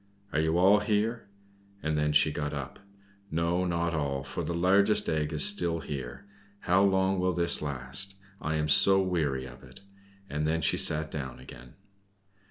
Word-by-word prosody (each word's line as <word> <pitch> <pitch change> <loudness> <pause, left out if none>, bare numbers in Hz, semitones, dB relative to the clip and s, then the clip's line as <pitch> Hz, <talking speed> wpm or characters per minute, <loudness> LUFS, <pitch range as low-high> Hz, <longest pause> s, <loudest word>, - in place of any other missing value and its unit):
Are 75 - +1
you 80 +1 +1
all 95 +4 +5
here?" 105 +2 -1 0.6
And 80 0 -1
then 75 0 +1
she 75 +1 +4
got 75 0 -4
up. 70 -1 -7 0.5
"No, 85 +2 0
not 85 -1 -1
all, 70 -3 -2
for 70 - -5
the 85 - -3
largest 100 +4 +3
egg 75 -1 -1
is 75 -2 +2
still 85 -5 +1
here. 70 +3 -7 0.4
How 95 +1 +2
long 95 -1 +2
will 90 0 +1
this 85 0 +1
last? 70 +7 -4 0.3
I 80 0 -2
am 75 -1 -1
so 95 +6 +5
weary 80 -9 -1
of 60 +1 -12
it!" 65 +2 -15 0.5
And 75 -1 -2
then 80 +1 0
she - - +2
sat 75 0 +2
down 65 -5 -6
again. 65 -1 -13
80 Hz, 175 wpm, -28 LUFS, 70-90 Hz, 0.6 s, all